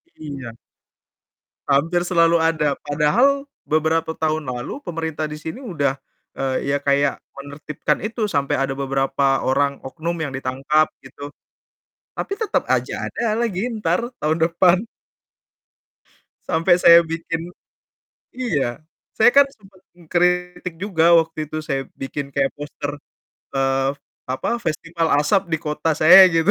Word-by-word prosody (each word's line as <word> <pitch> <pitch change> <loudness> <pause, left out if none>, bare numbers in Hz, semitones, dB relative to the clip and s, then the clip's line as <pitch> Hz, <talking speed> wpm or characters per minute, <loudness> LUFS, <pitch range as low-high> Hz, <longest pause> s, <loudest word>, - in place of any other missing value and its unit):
Iya. 135 -6 -8 1.1
Hampir 165 +6 +2
selalu 170 -2 +3
ada, 160 -3 +1
padahal 195 - +2 0.2
beberapa 160 +1 0
tahun 155 -1 -1
lalu 125 - -7
pemerintah 160 -3 -3
di 150 - -6
sini 155 +6 -7
udah, 145 - -1 0.4
eee, 135 +1 -2
ya, 140 - +2
kayak 140 0 +1 0.2
menertibkan 145 +2 -3
itu, 220 -1 -2
sampai 140 -5 0
ada 135 0 -1
beberapa 135 0 0
orang 140 +1 0
oknum 165 +5 -4
yang 155 - -2
ditangkap, 135 +3 +1 0.2
gitu. 145 0 -10 0.8
Tapi - - -4
tetap 435 0 -1
aja - - -1
ada 225 -1 -2
lagi 210 -5 -1
entar, 210 -3 -1 0.2
tahun 155 +1 0
depan. 175 +2 +4 1.7
Sampai 170 +2 +3
saya 170 -1 +8
bikin 165 0 -5 0.8
iya. 155 - -2 0.4
Saya 220 - +6
kan 280 0 +7
sempat 195 -6 -21 0.2
mengkritik 180 +1 -1
juga 170 -3 +2
waktu 160 -1 -2
itu, 155 - -4
saya 135 -3 -2
bikin 140 +1 -5
kayak 140 -1 0
poster, 145 0 -6 0.6
eee, 135 0 +1 0.4
apa, 130 +1 -3
festival 165 0 -2
asap 150 +7 +2
di - - +3
kota 150 0 -2
saya 185 +4 +9
gitu. 165 +2 +2
160 Hz, 125 wpm, -21 LUFS, 140-175 Hz, 1.7 s, saya